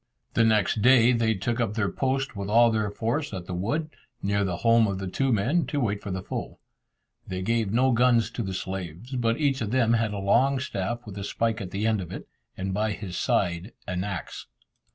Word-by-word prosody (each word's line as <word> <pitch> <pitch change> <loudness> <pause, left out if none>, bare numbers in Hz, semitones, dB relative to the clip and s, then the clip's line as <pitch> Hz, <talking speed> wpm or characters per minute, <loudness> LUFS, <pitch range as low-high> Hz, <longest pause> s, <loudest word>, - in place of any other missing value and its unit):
The 115 - +4
next 110 -1 +2
day 125 0 +6
they 115 -2 +2
took 120 +5 -2
up 110 -3 0
their 105 -3 0
post 135 -1 -1
with 100 0 -4
all 115 +2 +5
their 110 -2 0
force 115 +4 -2
at 90 -2 -6
the 90 - -6
wood, 145 - -2 0.3
near 100 +1 +1
the 90 -3 -2
home 115 -1 +5
of 100 -1 -2
the 95 - -4
two 135 +8 0
men, 130 - +1
to 145 - -1
wait 105 -5 -1
for - - -6
the 95 0 -3
foe. - - -5 0.7
They 95 0 -4
gave 115 -1 0
no 130 +4 +3
guns 120 -2 +3
to 120 - -4
the 95 -3 -3
slaves, 95 - -6
but 115 -2 +1
each 140 -4 +1
of 110 - -1
them 120 -1 +3
had 115 -2 +1
a 105 - -4
long 130 +8 +3
staff 120 -1 -3
with 100 -2 -8
a - - -4
spike 115 +2 -1
at 95 - -5
the 100 +4 -2
end 110 -3 +2
of 90 - -8
it, - - -7 0.3
and 95 0 -3
by 105 +1 0
his 95 -4 -7
side 85 +7 0
an 90 0 -2
axe. 100 -4 -6
110 Hz, 225 wpm, -26 LUFS, 95-120 Hz, 0.7 s, day